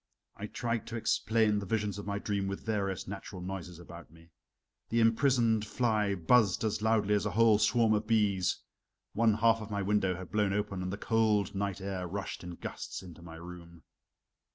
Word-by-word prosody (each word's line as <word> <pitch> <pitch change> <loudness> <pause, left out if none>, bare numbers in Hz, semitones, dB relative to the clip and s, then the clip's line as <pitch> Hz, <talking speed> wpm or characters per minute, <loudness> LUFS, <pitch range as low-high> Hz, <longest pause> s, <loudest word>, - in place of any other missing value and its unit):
I 105 - -6
tried 115 0 -3
to 115 - -6
explain 110 -1 +2
the 100 - -6
visions 105 -1 -1
of 100 - -8
my 100 0 -1
dream 100 -1 -2
with 100 0 -5
various 100 -4 -2
natural 100 0 -7
noises 90 -1 -6
about 85 -1 -12
me. 80 +1 -19 0.6
The 115 - +1
imprisoned 115 -1 +3
fly 105 -3 0
buzzed 100 +4 +3
as 110 -1 -1
loudly 110 -2 +2
as 105 0 +1
a 100 0 -4
whole 115 -2 +5
swarm 110 +1 +3
of 105 0 0
bees; 105 -5 +1 0.5
one 115 -1 +3
half 115 +1 +3
of 110 - -7
my 100 -1 -2
window 95 -2 +1
had 90 -1 -9
blown 105 -2 +1
open, 100 -2 -2
and 90 0 -3
the 100 - -4
cold 110 -3 +1
night 100 -1 -3
air 95 -2 -4
rushed 95 +2 -5
in 90 0 -7
gusts - - -7
into 85 -2 -12
my 85 -1 -10
room. 85 -1 -11
105 Hz, 190 wpm, -31 LUFS, 95-110 Hz, 0.6 s, whole